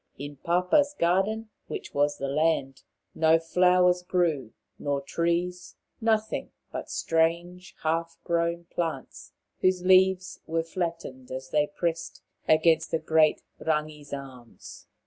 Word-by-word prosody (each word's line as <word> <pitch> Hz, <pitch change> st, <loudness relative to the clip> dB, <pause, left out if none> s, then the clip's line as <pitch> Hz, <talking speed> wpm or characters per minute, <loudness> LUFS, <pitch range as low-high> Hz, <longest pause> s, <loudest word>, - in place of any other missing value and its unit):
In 145 Hz, +1 st, -7 dB
Papa's 180 Hz, -, +2 dB
garden, 200 Hz, +6 st, +1 dB, 0.2 s
which -, -, -6 dB
was 145 Hz, 0 st, +1 dB
the 140 Hz, -, -3 dB
land, 140 Hz, -2 st, 0 dB, 0.3 s
no 160 Hz, 0 st, +4 dB
flowers 180 Hz, +2 st, +3 dB
grew, 170 Hz, -9 st, 0 dB, 0.3 s
nor 140 Hz, -1 st, -1 dB
trees; 170 Hz, +4 st, -2 dB, 0.3 s
nothing 220 Hz, -1 st, 0 dB, 0.2 s
but -, -, -6 dB
strange 175 Hz, +3 st, -1 dB
half 165 Hz, +1 st, -1 dB
grown 170 Hz, 0 st, 0 dB
plants 165 Hz, -5 st, -5 dB, 0.3 s
whose 185 Hz, -1 st, +2 dB
leaves 185 Hz, 0 st, +4 dB
were 165 Hz, 0 st, 0 dB
flattened 165 Hz, -7 st, -5 dB
as 130 Hz, +1 st, -7 dB
they 150 Hz, -1 st, +2 dB
pressed 165 Hz, +2 st, -3 dB, 0.2 s
against 160 Hz, +1 st, +3 dB
great 155 Hz, -1 st, +3 dB, 0.2 s
Rangi's 150 Hz, -2 st, -2 dB
arms. 130 Hz, -4 st, -10 dB
165 Hz, 115 wpm, -27 LUFS, 150-180 Hz, 0.3 s, no